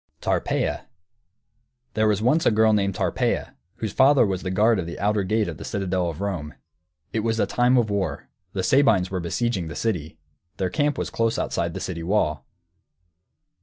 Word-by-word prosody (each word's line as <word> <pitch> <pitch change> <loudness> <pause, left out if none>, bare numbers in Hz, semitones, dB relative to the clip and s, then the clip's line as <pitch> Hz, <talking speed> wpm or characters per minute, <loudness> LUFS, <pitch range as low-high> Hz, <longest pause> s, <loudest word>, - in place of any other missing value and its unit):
TARPEIA - - -1 1.1
There 110 0 +2
was 105 0 +1
once 155 +8 +3
a - - +7
girl 110 0 +4
named 100 -2 +1
Tarpeia, - - -1 0.2
whose 110 - -4
father 135 -1 +5
was 95 -2 -2
guard 105 +4 +2
of 85 - -3
the 85 - -7
outer 105 +1 +1
gate 105 +3 0
of - - -5
the - - -8
citadel 95 -3 -1
of 80 +2 -7
Rome. 90 -7 -3 0.6
It 110 - 0
was 115 +1 -1
a - - +3
time 125 +1 +2
of 115 -4 +2
war, 95 -8 -2 0.3
the 95 - -2
Sabines 110 -7 +3
were 95 - -1
besieging 95 +1 -1
the 75 - -7
city. 80 -8 -2 0.4
Their 95 -2 -1
camp 145 -1 +1
was - - -3
close 115 0 0
outside - - -2
the - - -3
city 85 -3 -4
wall. 80 -7 0
100 Hz, 180 wpm, -24 LUFS, 90-115 Hz, 1.1 s, a